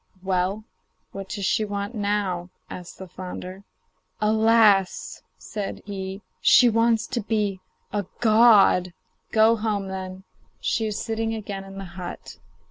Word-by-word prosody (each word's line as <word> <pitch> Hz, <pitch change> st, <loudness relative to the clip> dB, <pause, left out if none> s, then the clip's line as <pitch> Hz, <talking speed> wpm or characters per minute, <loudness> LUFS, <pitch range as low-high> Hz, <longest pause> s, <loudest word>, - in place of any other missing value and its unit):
'Well, 190 Hz, +2 st, 0 dB, 0.5 s
what 195 Hz, -1 st, -7 dB
does 200 Hz, -2 st, -3 dB
she 215 Hz, -, +2 dB
want 205 Hz, +1 st, -4 dB
now?' 200 Hz, -4 st, -1 dB, 0.2 s
asked 180 Hz, -1 st, -9 dB
the 190 Hz, -, -9 dB
flounder. 185 Hz, +1 st, -8 dB, 0.5 s
'Alas!' 215 Hz, -2 st, +3 dB, 0.2 s
said 205 Hz, -3 st, -6 dB
he, 195 Hz, 0 st, -6 dB, 0.2 s
'she 245 Hz, -, +7 dB
wants 230 Hz, 0 st, +2 dB
to 235 Hz, -, -3 dB
be 210 Hz, -3 st, -1 dB, 0.3 s
a 205 Hz, -3 st, -2 dB
god.' 215 Hz, -6 st, +5 dB, 0.4 s
'Go 220 Hz, +1 st, +5 dB
home, 210 Hz, -3 st, -2 dB
then; 190 Hz, 0 st, -6 dB, 0.4 s
she 225 Hz, -1 st, 0 dB
is 210 Hz, -, -3 dB
sitting 225 Hz, 0 st, -2 dB
again 200 Hz, -3 st, -6 dB
in 195 Hz, 0 st, -11 dB
the 195 Hz, -, -6 dB
hut. 175 Hz, 0 st, -8 dB
200 Hz, 130 wpm, -24 LUFS, 190-220 Hz, 0.5 s, she